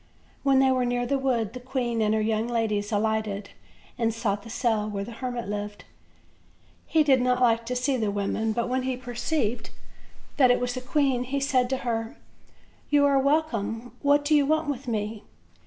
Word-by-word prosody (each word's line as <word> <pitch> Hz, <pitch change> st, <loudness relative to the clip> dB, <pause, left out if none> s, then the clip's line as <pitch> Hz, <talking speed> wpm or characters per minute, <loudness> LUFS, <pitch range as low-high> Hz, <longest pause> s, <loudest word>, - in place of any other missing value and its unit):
When 275 Hz, -1 st, +3 dB
they 265 Hz, 0 st, +5 dB
were 255 Hz, -1 st, +2 dB
near 245 Hz, 0 st, 0 dB
the 275 Hz, +2 st, 0 dB
wood 240 Hz, -6 st, 0 dB
the 250 Hz, -, -6 dB
queen 245 Hz, -3 st, -2 dB
and 215 Hz, 0 st, +2 dB
her 220 Hz, -, +1 dB
young 220 Hz, +1 st, 0 dB
ladies 220 Hz, -3 st, -1 dB
alighted, 215 Hz, -1 st, -1 dB, 0.5 s
and 230 Hz, -1 st, +2 dB
sought 215 Hz, -3 st, -2 dB
the 230 Hz, -, -12 dB
cell 225 Hz, -3 st, 0 dB
where 200 Hz, -1 st, -3 dB
the 230 Hz, -, -8 dB
hermit 245 Hz, -1 st, -4 dB
lived. 205 Hz, 0 st, -5 dB, 1.0 s
He 320 Hz, -2 st, +3 dB
did 270 Hz, -4 st, +4 dB
not 250 Hz, 0 st, +2 dB
like 230 Hz, -2 st, +2 dB
to 250 Hz, -, -2 dB
see 255 Hz, +2 st, +1 dB
women; 205 Hz, +1 st, -1 dB
but 235 Hz, +2 st, -1 dB
when 255 Hz, +1 st, 0 dB
he 255 Hz, -1 st, -2 dB
perceived 245 Hz, -1 st, -2 dB, 0.7 s
that 260 Hz, -3 st, +6 dB
it 245 Hz, -, +4 dB
was 245 Hz, 0 st, -1 dB
the 255 Hz, -, -4 dB
queen 260 Hz, -1 st, +1 dB
he 280 Hz, +2 st, -2 dB
said 255 Hz, -3 st, +1 dB
to 265 Hz, -, 0 dB
her: 225 Hz, -1 st, -2 dB, 0.7 s
"You 290 Hz, -1 st, +4 dB
are 280 Hz, -1 st, +4 dB
wel 290 Hz, +4 st, +3 dB
come; 225 Hz, -3 st, -5 dB
what 290 Hz, 0 st, +3 dB
do 305 Hz, -, +2 dB
you 295 Hz, -1 st, +5 dB
want 315 Hz, +1 st, +1 dB
with 275 Hz, -2 st, -4 dB
me?" 215 Hz, -1 st, -2 dB
245 Hz, 195 wpm, -26 LUFS, 220-265 Hz, 1.0 s, that